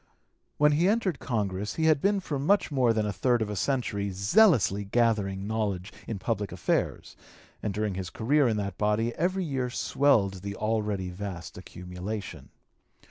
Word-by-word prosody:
When 150 0 +5
he 160 +5 +3
entered 200 -6 +1
Congress 105 -4 -2
he 160 - 0
had 155 -3 +4
been 200 0 +2
for 145 -6 -3
much 180 +5 +2
more 130 -4 +3
than 110 -1 0
a 105 - -2
third 120 +6 +2
of 105 - -5
a - - -3
century 105 -5 -1
zealously 105 - +3
gathering 100 -3 0
knowledge 100 -3 -2
in 110 - -3
public 105 0 -2
affairs, 90 -1 -2 0.5
and 105 - -2
during 105 0 -1
his 90 -1 -4
career 140 +4 +2
in 110 -2 +1
that 100 -3 -4
body 105 +3 +1
every 185 +6 0
year 135 -6 -2
swelled 110 -8 +1
the 100 +1 -5
already 105 -4 -1
vast 90 -3 -7
accumulation. 90 +3 -7
110 Hz, 165 wpm, -28 LUFS, 100-135 Hz, 0.5 s, When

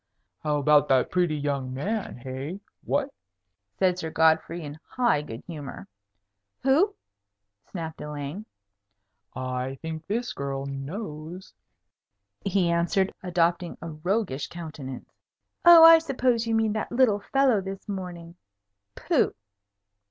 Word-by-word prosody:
"How 150 -1 0
about 150 0 +4
that 130 -1 +3
pretty 175 -4 +1
young 140 -3 -2
man? 205 - -3
Hey? 130 +8 -6 0.2
What?" 280 -1 -1 0.6
said 180 -1 +2
Sir 160 - -3
Godfrey, 160 +1 +2
in 145 +1 -8
high 240 - +1
good 115 -5 -8
humour. 140 - -8 0.8
"Who?" 325 +11 +3 0.7
snapped 165 -4 -6
Elaine. 150 +7 -6 0.9
"I 130 +1 -3
think 160 -1 -6
this 235 +4 -2
girl 135 0 -4
knows," 155 +4 -7 0.9
he 195 -2 +1
answered, 175 +3 +1
adopting 175 -1 0
a 170 - -7
roguish 160 -2 -1
countenance. 155 -6 -8 0.5
"Oh, 340 -1 +10
I 330 0 +10
suppose 250 -6 0
you 225 - +1
mean 220 -1 +2
that 215 - -3
little 240 -4 +3
fellow 260 -1 +2
this 195 +2 -7
morning. 175 -4 -6 0.6
Pooh!" - - +1
170 Hz, 120 wpm, -26 LUFS, 145-210 Hz, 0.9 s, Oh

